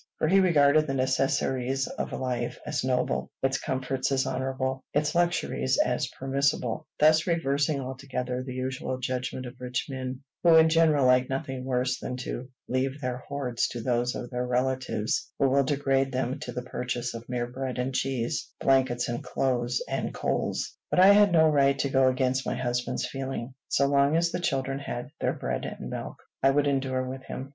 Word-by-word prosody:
For - - +1
he 195 +4 +5
regarded 155 -4 +4
the 135 - -1
necessaries 130 0 +1
of - - -5
life 125 -2 -2
as 150 -2 -2
noble, 130 -1 0
its 135 +1 +1
comforts 130 0 -2
as 135 -1 +2
honorable, 130 0 -2
its 150 0 +1
luxuries 170 -6 +1
as 125 +3 +1
permissible, 135 -2 -1
thus 155 +2 +5
reversing 145 -3 +1
altogether 130 -1 -4
the 130 -1 -6
usual 130 0 -3
judgment 130 0 -3
of 125 +1 -10
rich 125 -1 -2
men, 130 -1 -5 0.2
who 170 -2 +6
in 160 0 +7
general 160 -4 +4
like 125 0 +4
nothing 135 -1 -3
worse 125 0 0
than 125 - -4
to 130 0 -5 0.2
leave 130 +2 -1
their 125 -3 -2
hoards 130 -2 -2
to 120 - -6
those 120 0 0
of 120 - -6
their 125 0 -1
relatives 125 -3 -1
who 140 - +3
will 140 +1 +3
degrade 135 -1 +1
them 130 +2 -2
to 150 - -6
the 125 - -4
purchase 125 -1 -3
of 115 +1 -9
mere 125 -1 -1
bread 130 +1 -5
and 125 +1 -1
cheese, 130 -3 -1
blankets 130 -2 +2
and 120 0 -3
clothes 125 -2 0
and - - -3
coals. - - -2
But - - +1
I 190 +2 +8
had 205 -1 +6
no 160 -2 +6
right 140 -2 +3
to 140 +1 0
go 135 -1 +4
against 130 0 +1
my - - -2
husband's 125 0 -1
feeling. 135 -2 -5
So 140 - +2
long 140 +2 +3
as 170 0 +2
the - - -2
children 135 -4 -1
had 140 0 -5
their - - 0
bread 60 -1 -3
and - - -6
milk, - - -6 0.2
I 135 - +5
would 145 +1 +3
endure 135 -2 0
with 130 +1 -6
him. 135 +1 -6
130 Hz, 185 wpm, -27 LUFS, 125-140 Hz, 0.2 s, I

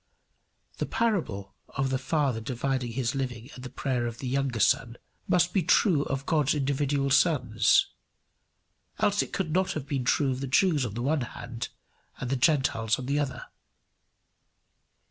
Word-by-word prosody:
The - - -1
parable 135 - -1 0.2
of 135 -1 -2
the 130 - 0
father 135 -4 0
dividing 125 0 -2
his 125 -1 -1
living 125 -2 -4
at 125 - -11
the 130 - -7
prayer 125 -3 -2
of 115 -1 -6
the 130 - -5
younger 135 -2 -1
son, 120 +3 +2 0.3
must 175 -1 +2
be 195 - +3
true 170 -1 +3
of 135 0 -3
God's 150 -2 +2
individual 140 0 0
sons, 130 -7 +4 1.1
else 205 0 +2
it - - -5
could 180 -5 -2
not 185 +2 +1
have 150 -3 -4
been 135 -2 -2
true 135 +2 +2
of 130 - -3
the 135 - -3
Jews 145 -1 +3
on 105 - -8
the 120 - -3
one 145 +2 +1
hand 120 0 -6 0.5
and 125 - -4
the - - +2
Gentiles 120 -5 +2
on 130 - -6
the 140 +2 0
other. 130 -4 -3
135 Hz, 165 wpm, -27 LUFS, 125-145 Hz, 1.1 s, sons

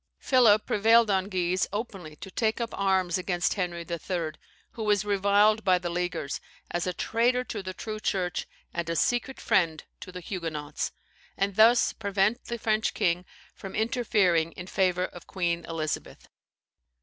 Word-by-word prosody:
Philip 230 -5 +4
prevailed 225 +1 +4
on 190 0 +1
Guise 185 -1 0
openly 195 -7 -5
to 190 - -10
take 220 +3 0
up 235 -1 -2
arms 190 -3 +1
against 180 -1 0
Henry 175 -3 -3
III. 170 -1 -3 0.4
(who 230 - -8
was 210 -1 +2
reviled 205 +2 +3
by 185 -2 +4
the 175 -1 -4
Leaguers 175 -5 -2 0.3
as 175 +1 -1
a 180 - -1
traitor 240 +6 +1
to 250 - -5
the 185 -1 -6
true 215 -1 -5
Church, 185 -4 -1 0.3
and 170 -1 -3
a 165 - -1
secret 245 +8 0
friend 165 -4 +1 0.2
to 185 - -9
the 180 - -7
Huguenots); 160 -5 -4 0.5
and 195 0 0
thus 230 +3 +5
prevent 200 +2 0
the 235 - -4
French 220 -1 0
king 175 +1 +1 0.3
from 195 - -9
interfering 205 -8 +2
in 175 - -8
favour 185 -1 +1
of 175 - -11
Queen 170 -2 -1
Elizabeth. 155 -2 -4
190 Hz, 160 wpm, -27 LUFS, 175-215 Hz, 0.5 s, thus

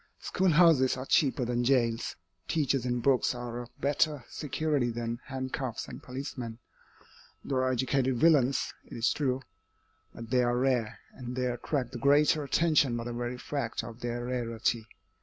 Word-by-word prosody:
Schoolhouses 165 -8 +4
are 130 - -5
cheaper 135 -5 +2
than 120 0 0
jails, 120 -3 +1 0.3
teachers 135 -5 +1
and 120 -1 -1
books 135 -1 +3
are 120 0 -5
a 120 - -9
better 145 -1 +1
security 150 -3 -1
than 115 0 -3
handcuffs 130 -3 -4
and - - -9
policemen. 125 -3 -6 0.9
There 135 -2 0
are 130 0 +1
educated 130 0 +1
villains, 140 -3 +3
it - - -10
is 115 - +2
true. 135 -2 -1 0.7
But 115 0 -10
they 125 -1 +4
are 120 0 +1
rare, 125 -4 +1 0.2
and 125 -1 -7
they 130 -1 0
attract 125 +1 -2
the 120 - -6
greater 145 +3 +4
attention 145 -4 +2
by 115 - -3
the 120 0 -5
very 120 +1 -3
fact 130 -3 -3
of 115 0 -9
their 120 0 -3
rarity. 115 -2 -1
125 Hz, 160 wpm, -29 LUFS, 120-140 Hz, 0.9 s, Schoolhouses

